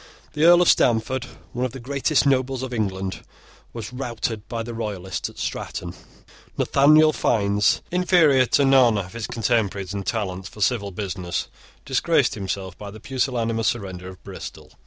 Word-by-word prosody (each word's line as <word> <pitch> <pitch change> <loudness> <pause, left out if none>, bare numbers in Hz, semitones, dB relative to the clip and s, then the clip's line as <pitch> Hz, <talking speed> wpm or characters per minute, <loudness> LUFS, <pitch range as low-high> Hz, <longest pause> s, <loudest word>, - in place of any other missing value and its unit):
The 150 +1 +2
Earl 175 +1 +7
of - - 0
Stamford, 120 +2 +2 0.3
one 125 - -2
of 130 -2 -2
the 135 - -7
greatest 140 +3 +1
nobles 130 -1 +1
of 130 -1 -5
England, 95 -4 -2 0.5
was 115 0 -7
routed 115 -4 -4
by 115 -1 -3
the 120 +1 -6
Royalists 100 -5 -4
at - - -16
Stratton. - - -4 0.6
Nathaniel 155 +3 +5
Fiennes, 105 -5 +2
inferior 170 -8 +4
to 140 - +3
none 130 -5 +5
of 95 -1 -5
his 115 -2 -4
contemporaries 105 -4 -1
in 100 - -3
talents 95 -3 -3
for - - -14
civil 100 0 +1
business, 90 -2 -4 0.4
disgraced - - +2
himself 95 -1 -4
by 105 - -7
the 110 +2 -11
pusillanimous 115 -3 -1
surrender 95 -5 -3
of 95 - -13
Bristol. - - -9
115 Hz, 155 wpm, -23 LUFS, 100-130 Hz, 0.6 s, Earl